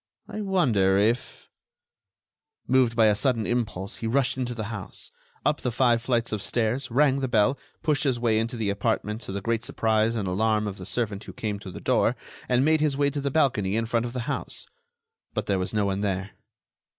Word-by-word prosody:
I 215 - -5
wonder 120 - +3
if—" 115 +4 0 1.2
Moved 125 -2 +3
by 115 -1 +5
a 105 - +5
sudden 115 -2 +1
impulse, 110 -4 -2
he 115 - -3
rushed 130 +2 +1
into 125 -2 -3
the 110 - -3
house, 100 -4 -8 0.3
up - - +1
the 125 - -1
five 120 -1 +3
flights 120 -1 0
of 105 -2 -2
stairs, 120 +5 0
rang 135 +2 +3
the 135 - -1
bell, 120 +3 +2 0.2
pushed 150 -1 +1
his 130 -4 +1
way 115 -2 +2
into 115 +2 -2
the 105 -3 0
apartment 105 +1 -1
to - - -7
the 100 +1 -3
great 115 +2 -1
surprise 110 0 +1
and 105 -4 -2
alarm 105 +3 +1
of 100 -2 -5
the 90 - -7
servant 105 -4 -2
who - - -9
came 105 -2 -3
to 100 - -9
the - - -8
door, - - +2 0.3
and 125 +2 +3
made 155 0 +3
his 145 -3 +1
way 140 0 +2
to 145 - -3
the 140 - 0
balcony 120 -10 +1
in 115 0 0
front 115 +1 0
of 120 - -8
the 125 - -2
house. 115 - -3 0.7
But - - -1
there 100 -2 +1
was 90 - -2
no 105 -2 +1
one 100 0 -1
there. 95 -1 -2
115 Hz, 210 wpm, -26 LUFS, 105-130 Hz, 1.2 s, by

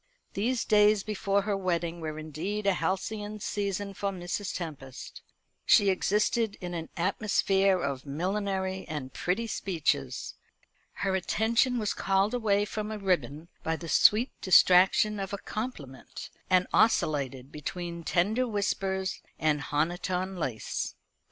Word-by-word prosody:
These 230 +4 0
days 210 -1 +4
before 200 -1 0
her 205 0 0
wedding 170 -3 -2
were 155 -1 -4
indeed 160 +7 -4
a 200 - +4
halcyon 205 +5 -2
season 200 -1 -2
for 200 +1 -2
Mrs. 185 +1 -4
Tempest. 140 -7 -7 0.4
She 200 -1 +5
existed 210 +3 +1
in 180 -2 -5
an 165 -1 -5
atmosphere 195 0 +2
of 140 -5 -3
millinery 190 +4 -2
and 145 -5 -5
pretty 190 +6 -1
speeches. 150 - -1 0.6
Her 195 -1 -1
attention 230 +6 +1
was 215 -3 0
called 195 +3 +1
away 205 -4 +2
from 215 0 -4
a 215 - -4
ribbon 165 - -1
by 160 - -1
the 165 +1 -8
sweet 220 - +5
distraction 185 +3 +5
of 195 0 -4
a - - -1
compliment, 185 - -7 0.2
and 180 0 +4
oscillated 140 - +2
between 170 +3 -5
tender 215 +10 +1
whispers 195 -3 -1 0.2
and 150 -2 +1
honiton 180 +5 -1
lace. 135 -10 -3
190 Hz, 130 wpm, -29 LUFS, 165-205 Hz, 0.6 s, She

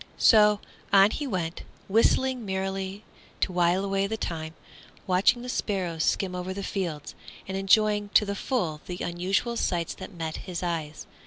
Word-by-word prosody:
So, 210 -2 +6 0.3
on 200 +1 +7
he 290 - -3
went, 175 -7 -3 0.3
whistling 245 +4 +2
merrily 190 0 -3 0.4
to 185 - +1
while 175 +2 +2
away 195 0 0
the 220 +2 -3
time, 160 -4 -4 0.5
watching 190 +6 +3
the - - -6
sparrows 185 -9 -1
skim 185 +3 0
over 180 +1 -4
the 200 - -4
fields, 170 -7 -4 0.3
and 190 - -4
enjoying 205 +1 +3
to 210 - +6
the 200 - -2
full 185 - -2
the 180 - -5
unusual 185 +7 -1
sights 170 -7 -1
that - - -9
met 165 -3 -4
his 180 -2 -6
eyes. 160 -3 -3
190 Hz, 160 wpm, -27 LUFS, 175-210 Hz, 0.5 s, on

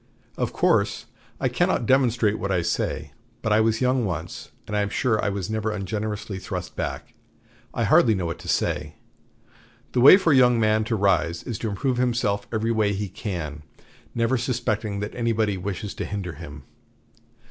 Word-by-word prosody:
Of - - -2
course - - +1 0.3
I - - +1
cannot - - +1
demonstrate 120 -4 +2
what 100 - -2
I 90 -2 +1
say; 85 - -2 0.3
but 110 - +1
I 110 - +5
was 110 +1 +1
young 130 0 +2
once, 85 -4 -5 0.2
and 105 - -4
I 105 - +2
am 100 - -1
sure 110 0 0
I - - +1
was 100 -3 -3
never 110 0 -2
ungenerously 105 0 -4
thrust - - -6
back. - - -5 0.6
I - - -1
hardly 110 -3 +5
know 90 -2 -2
what 85 - -4
to - - -11
say. 75 0 -1 1.0
The 125 - +1
way 145 +8 +10
for 170 -6 +2
a - - +5
young 125 -2 +5
man 110 0 +2
to 115 - -1
rise 90 -4 +1
is 115 -5 -5
to 110 - -2
improve 125 +5 -1
himself 120 -5 0
every 115 +1 0
way 110 -2 +1
he 100 0 -3
can, 85 -7 -5 0.5
never 115 +2 +1
suspecting 110 -4 -2
that 105 - -4
anybody 115 -4 0
wishes 95 +2 -4
to - - -4
hinder 100 -4 -4
him. 75 -2 -10
105 Hz, 180 wpm, -24 LUFS, 95-115 Hz, 1.0 s, way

